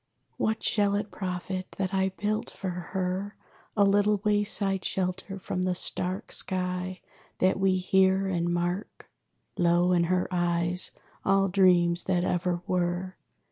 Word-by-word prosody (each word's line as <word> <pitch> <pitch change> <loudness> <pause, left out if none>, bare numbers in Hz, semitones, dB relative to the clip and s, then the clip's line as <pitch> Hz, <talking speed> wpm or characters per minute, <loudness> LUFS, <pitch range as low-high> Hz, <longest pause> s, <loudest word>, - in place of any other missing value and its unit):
What 220 0 -1
shall 205 -1 +2
it 205 0 -3
profit, 185 0 -5
that 190 0 -2
I 190 0 +2
built 210 +3 -2
for 190 -2 -5
her 185 +3 -3 0.4
A 205 - +5
little 205 +1 +3
wayside 205 -2 +1
shelter 190 +1 -2
from 185 -1 -4
the 185 0 0
stark 185 +2 -1
Sky 180 0 +1 0.4
that 185 +1 +2
we 190 -1 +3
hear, 190 +1 +3
and 175 -2 -1
mark? 175 +3 -3 0.5
Lo, 175 +1 +3
in 175 -1 +3
her 180 +1 +1
eyes 175 0 +1 0.3
all 195 0 +3
dreams 175 -2 +3
that 180 -2 +1
ever 175 -1 -1
were! 180 +1 -1
185 Hz, 140 wpm, -27 LUFS, 180-195 Hz, 0.5 s, A